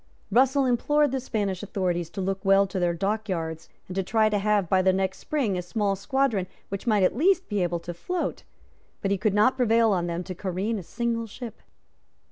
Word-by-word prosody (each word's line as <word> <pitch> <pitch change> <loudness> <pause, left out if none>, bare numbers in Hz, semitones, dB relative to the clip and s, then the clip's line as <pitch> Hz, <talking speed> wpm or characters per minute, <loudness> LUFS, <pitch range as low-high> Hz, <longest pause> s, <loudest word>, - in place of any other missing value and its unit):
Russell 265 +4 +4
implored 290 +4 +2
the 265 - -1
Spanish 205 -7 -2
authorities 180 -4 -2
to 190 - -5
look 190 0 -2
well 195 0 +5
to 190 -1 -4
their 175 -1 +2
dockyards, 180 -5 -3 0.2
and 185 - -6
to 195 - 0
try 215 +3 +2
to 210 -1 +1
have, 205 -2 +1
by 190 +2 +3
the 190 0 +4
next 190 0 -1
spring, 260 -11 -1
a 180 - -1
small 195 +3 -1
squadron 210 -1 0 0.2
which 195 +4 -5
might 210 -4 +3
at 185 - +3
least 370 +7 +3
be 205 -3 -1
able 175 -1 0
to 175 +1 -6
float; 355 - -3 0.6
but 195 - 0
he 200 - +2
could 215 -1 +1
not 215 +5 +4
prevail 230 -2 +4
on 175 -3 0
them 170 +1 -3
to 185 - -6
careen 195 +4 -2
a - - -6
single 230 +4 -2
ship. 230 +1 -9
200 Hz, 210 wpm, -26 LUFS, 185-230 Hz, 0.6 s, well